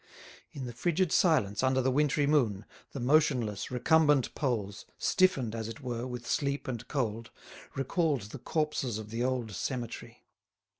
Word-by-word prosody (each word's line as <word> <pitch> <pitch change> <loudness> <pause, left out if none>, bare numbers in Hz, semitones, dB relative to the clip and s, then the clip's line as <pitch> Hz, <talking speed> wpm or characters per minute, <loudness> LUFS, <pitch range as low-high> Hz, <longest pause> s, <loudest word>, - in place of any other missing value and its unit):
In 135 -3 -6
the 120 - -6
frigid 175 +7 0
silence 110 - +3
under 130 0 +2
the 130 0 +2
wintry 145 +1 +2
moon, 115 -9 +2 0.3
the 140 - -6
motionless, 125 -6 +2
recumbent 145 +2 +3
poles, 110 -8 -2
stiffened, 160 - +2
as 110 -1 -4
it 115 +6 -8
were, 120 -1 -3
with 125 -1 -6
sleep 140 +2 -1
and 120 -4 -4
cold, 115 -4 -2 0.5
recalled 140 - 0
the 140 - -7
corpses 150 -6 -1
of 110 -1 -8
the 115 +2 -1
old 125 -3 -1
cemetery. 120 +4 -5
130 Hz, 150 wpm, -30 LUFS, 115-145 Hz, 0.5 s, silence